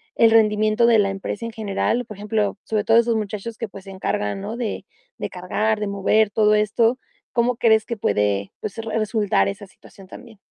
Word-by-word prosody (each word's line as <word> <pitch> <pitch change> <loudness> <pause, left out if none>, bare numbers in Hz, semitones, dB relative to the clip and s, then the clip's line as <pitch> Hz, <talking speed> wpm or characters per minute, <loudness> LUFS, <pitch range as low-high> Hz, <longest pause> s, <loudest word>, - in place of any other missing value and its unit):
el 225 -1 +5
rendimiento 215 +1 +3
de 230 -2 +5
la 195 -1 +2
empresa 195 +3 -5
en 230 - -5
general? 220 +3 -1
Por 210 -2 -10
ejemplo, 210 -1 -1
sobre 215 -2 -1
todo 225 +2 +4
esos 235 0 +3
muchachos 215 +1 -4
que 230 - -5
pues, 195 -1 -12
se 195 - -9
encargan, 190 - -2
¿no? 215 +4 -5
De 240 -3 -4 0.3
de - - -4
cargar, 210 +4 -1
de 210 - -2
mover 200 +2 +2
todo 210 0 +3
esto, 225 +4 +2 0.3
¿cómo 240 +1 +1
crees 220 -2 +3
que 235 - -4
puede, 100 - 0
pues, 210 - -6
resultar 220 -2 0
esa 200 +1 -5
situación 195 0 -17
también? 225 +3 -13
215 Hz, 195 wpm, -22 LUFS, 200-225 Hz, 0.3 s, el